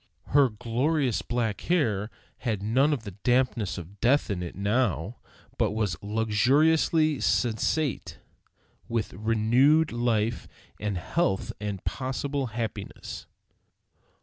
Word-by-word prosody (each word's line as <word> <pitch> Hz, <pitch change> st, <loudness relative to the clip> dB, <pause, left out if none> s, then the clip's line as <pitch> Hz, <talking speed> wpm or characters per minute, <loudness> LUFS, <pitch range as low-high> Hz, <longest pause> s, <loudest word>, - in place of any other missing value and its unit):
Her 140 Hz, -2 st, +5 dB
glorious 125 Hz, +4 st, 0 dB
black 115 Hz, -4 st, -2 dB
hair 115 Hz, -, +1 dB, 0.3 s
had 110 Hz, -5 st, -2 dB
not 135 Hz, +5 st, +2 dB
the 105 Hz, -, -8 dB
dampness 120 Hz, -6 st, +1 dB
of 95 Hz, +3 st, -10 dB
death 125 Hz, -1 st, +3 dB
in 90 Hz, -3 st, -2 dB
it 85 Hz, -, -6 dB
now, 100 Hz, -, 0 dB, 0.4 s
but -, -, +2 dB
was 105 Hz, -4 st, 0 dB
luxuriously 140 Hz, +9 st, +2 dB
sensate 125 Hz, +4 st, 0 dB, 0.7 s
with 115 Hz, -2 st, -2 dB
renewed 120 Hz, -, +3 dB
life 115 Hz, -1 st, 0 dB, 0.3 s
and 105 Hz, -3 st, -2 dB
health 95 Hz, -, -1 dB
and 100 Hz, -3 st, -4 dB
possible 135 Hz, +1 st, -2 dB
happiness. 110 Hz, -3 st, -6 dB
115 Hz, 105 wpm, -27 LUFS, 105-135 Hz, 0.7 s, Her